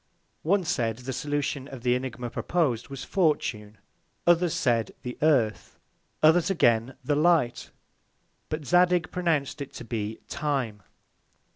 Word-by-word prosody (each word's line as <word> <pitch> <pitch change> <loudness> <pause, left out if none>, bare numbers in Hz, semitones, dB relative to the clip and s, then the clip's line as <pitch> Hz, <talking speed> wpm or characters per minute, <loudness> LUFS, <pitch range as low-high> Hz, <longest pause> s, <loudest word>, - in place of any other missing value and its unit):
One 190 +4 +2
said, 115 -8 -1
the 125 +1 -6
Solution 140 +1 -2
of 130 -4 -10
the 125 -1 +3
Ænigma 125 -2 -4
propos'd 135 -10 0
was 135 -1 -6
Fortune; 115 - 0 0.5
others 175 -1 +3
said 115 -3 0
the 125 0 -5
Earth; 130 -9 +1 0.5
and 155 - +9
others 175 +3 +3
again 120 -8 +2
the 145 - +1
Light: 155 -6 +2 0.8
But 155 -1 -4
Zadig 175 +1 +3
pronounced 160 -6 -1
it 140 - -7
to - - -8
be 110 -2 -4
Time. 130 -8 -2
135 Hz, 135 wpm, -27 LUFS, 120-160 Hz, 0.8 s, and